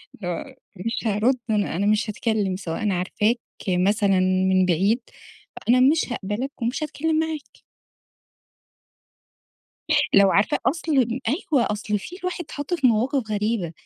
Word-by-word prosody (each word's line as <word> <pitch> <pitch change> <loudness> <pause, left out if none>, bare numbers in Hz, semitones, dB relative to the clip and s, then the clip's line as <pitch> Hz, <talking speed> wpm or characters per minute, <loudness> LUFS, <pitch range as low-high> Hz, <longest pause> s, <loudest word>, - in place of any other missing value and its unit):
اللي 190 - -7
هو 255 +10 -5 0.2
مش 215 +5 -3
هارُد 220 +5 +2
أنا 210 -6 0
أنا 195 +4 0
مش 215 +1 +2
هاتكلم 210 -3 -1
سواء 180 +1 -5
أنا 205 -3 +1
عارفاك 210 +5 +1 0.3
مثلًا 195 +1 +2
من 185 0 +3
بعيد، 195 +8 +2 0.7
أنا 250 +2 +5
مش 275 -1 +3
هاقبلك 235 +6 -4
ومش 240 +6 -1
هاتكلم 310 +1 -1
معاك. 320 -2 -5 2.5
لو 200 -1 +6
عارفاه 200 +2 +2
أصل، 270 -6 +1
أيوه 285 - +1
أصل 210 0 -2
في 350 - -9
الواحد 365 -1 -3
اتحط 290 +4 -4
في 280 -7 +2
مواقف 240 +1 +1
غريبة، 210 -5 -1
215 Hz, 135 wpm, -23 LUFS, 195-265 Hz, 2.5 s, لو